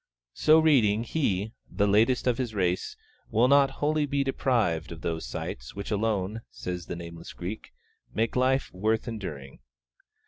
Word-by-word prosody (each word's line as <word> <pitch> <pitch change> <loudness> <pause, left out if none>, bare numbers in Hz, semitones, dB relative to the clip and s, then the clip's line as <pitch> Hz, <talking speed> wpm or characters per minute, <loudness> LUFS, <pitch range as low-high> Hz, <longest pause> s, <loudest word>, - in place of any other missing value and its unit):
So 155 +1 +5
reading, 120 -9 +4
he, 110 -7 -1 0.2
the 100 +3 +1
latest 110 +5 +3
of 125 -1 +1
his 120 -4 -2
race, 90 -2 0 0.3
will 115 +3 +4
not 140 0 +5
wholly 150 +2 0
be 140 0 +1
deprived 115 - 0
of 80 -1 -8
those 80 -5 -3
sights 60 +1 -6
which 100 +2 -5
alone 105 0 0
(says 90 -1 -6
the - - -4
nameless 85 -1 -9
Greek) 95 +5 -6 0.4
make 110 +1 -1
life 130 +1 +1
worth 110 +5 0
enduring. 90 - -6
110 Hz, 150 wpm, -27 LUFS, 90-130 Hz, 0.4 s, So